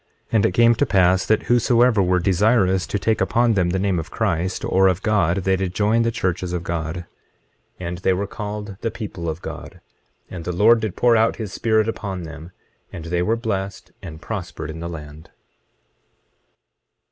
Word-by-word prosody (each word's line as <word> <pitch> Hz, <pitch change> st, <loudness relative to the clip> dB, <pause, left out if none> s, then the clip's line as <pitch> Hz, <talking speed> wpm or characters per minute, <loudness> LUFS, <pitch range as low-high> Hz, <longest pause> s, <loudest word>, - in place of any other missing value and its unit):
And 110 Hz, -3 st, +3 dB
it 90 Hz, -, -3 dB
came 115 Hz, +3 st, +5 dB
to 130 Hz, +5 st, +1 dB
pass 95 Hz, -2 st, +3 dB
that 110 Hz, -, +2 dB
whosoever 120 Hz, -2 st, +3 dB
were 90 Hz, -1 st, +2 dB
desirous 95 Hz, 0 st, +2 dB
to -, -, -1 dB
take 110 Hz, +2 st, 0 dB
upon 120 Hz, -1 st, +2 dB
them 90 Hz, -4 st, +1 dB
the 90 Hz, -, 0 dB
name 95 Hz, -2 st, 0 dB
of 80 Hz, +1 st, -6 dB
Christ, 95 Hz, -4 st, -1 dB
or 95 Hz, +1 st, +3 dB
of 95 Hz, 0 st, 0 dB
God, 95 Hz, -4 st, +1 dB
they 95 Hz, +1 st, +2 dB
did 95 Hz, -1 st, -3 dB
join 110 Hz, +2 st, +2 dB
the 115 Hz, -, +2 dB
churches 90 Hz, -5 st, -2 dB
of 85 Hz, -1 st, -3 dB
God; 85 Hz, 0 st, -4 dB, 0.7 s
25:24 90 Hz, -, -5 dB
And 85 Hz, +1 st, -4 dB
they 95 Hz, 0 st, +2 dB
were 100 Hz, +2 st, -1 dB
called 105 Hz, -1 st, -6 dB
the 115 Hz, -, -1 dB
people 100 Hz, -7 st, -6 dB
of 80 Hz, +2 st, -6 dB
God. -, -, -8 dB, 0.5 s
And 85 Hz, -2 st, -8 dB
the 90 Hz, -, -3 dB
Lord 110 Hz, +6 st, +5 dB
did 105 Hz, -3 st, -3 dB
pour 120 Hz, -1 st, +4 dB
out 110 Hz, 0 st, +3 dB
his 105 Hz, -4 st, -6 dB
Spirit 110 Hz, -1 st, +1 dB
upon 100 Hz, -5 st, -4 dB
them, 80 Hz, +1 st, -9 dB, 0.4 s
and 80 Hz, -, -8 dB
they 85 Hz, +1 st, -1 dB
were 110 Hz, +6 st, +1 dB
blessed, 100 Hz, -4 st, -4 dB
and 80 Hz, -4 st, -9 dB
prospered 90 Hz, -5 st, -6 dB
in 80 Hz, -, -8 dB
the 85 Hz, +1 st, -5 dB
land. 75 Hz, -1 st, -10 dB
95 Hz, 195 wpm, -21 LUFS, 85-110 Hz, 0.7 s, came